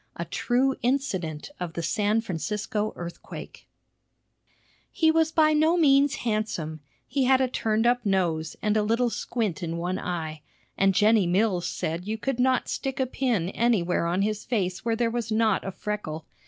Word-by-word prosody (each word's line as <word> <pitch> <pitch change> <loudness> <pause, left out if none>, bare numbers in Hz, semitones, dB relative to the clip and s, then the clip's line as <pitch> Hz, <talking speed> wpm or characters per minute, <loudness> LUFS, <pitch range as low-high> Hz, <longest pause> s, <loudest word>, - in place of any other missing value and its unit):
A 170 - -4
TRUE 255 +10 +1
INCIDENT 195 - -1
OF 175 -2 -4
THE 170 - -4
SAN 210 +5 +1
FRANCISCO 210 +2 -2
EARTHQUAKE 170 0 -9 1.2
He 320 -1 +3
was 320 0 +2
by 310 -2 +4
no 315 +3 +3
means 280 -3 +4
handsome; 215 -8 -2 0.3
he 270 0 0
had 260 0 +5
a 260 - +2
turned 225 -2 0
up 245 0 +3
nose, 175 -6 0
and 210 -1 +2
a 215 - +3
little 230 +3 +1
squint 215 -7 -2
in 165 -1 -3
one 180 +2 -2
eye; 160 -3 -4 0.3
and 195 -1 +3
Jennie 210 -1 +4
Mills 185 -1 +1
said 170 +4 -3
you 220 +1 -2
could 260 +2 -2
not 255 0 +2
stick 270 0 -3
a 260 - +2
pin 240 -9 -1
anywhere 195 -7 +1
on 180 +3 +1
his 210 0 -1
face 190 -6 -2
where 230 -1 +1
there 230 0 0
was 235 -1 -3
not 215 -2 +2
a 195 - -4
freckle. 180 -6 -5
215 Hz, 170 wpm, -26 LUFS, 180-245 Hz, 1.2 s, had